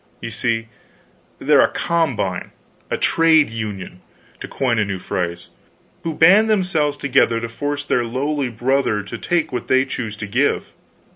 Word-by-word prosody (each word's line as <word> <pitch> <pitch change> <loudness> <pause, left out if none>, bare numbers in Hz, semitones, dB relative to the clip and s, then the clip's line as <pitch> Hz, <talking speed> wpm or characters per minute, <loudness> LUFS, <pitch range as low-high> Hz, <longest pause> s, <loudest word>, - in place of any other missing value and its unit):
You 115 - -6
see? 115 0 -1 0.7
They're - - +4
a - - +2
'combine' 130 - -1 0.4
a - - -1
trade 160 -5 +3
union, 100 -5 -6 0.4
to - - -7
coin 120 -4 0
a - - +3
new 100 -1 -3
phrase 85 -1 -4 0.5
who 165 -2 -4
band 195 +8 +6
themselves 170 -8 +1
together 130 -5 +2
to 115 - -4
force 145 +5 -4
their 125 -4 +1
lowly 135 +3 -2
brother 120 -2 0
to 95 - -7
take 175 -4 0
what 125 - -3
they 130 +1 +3
choose 115 -5 -5
to 110 - -5
give. 125 +8 0
125 Hz, 155 wpm, -20 LUFS, 110-150 Hz, 0.7 s, band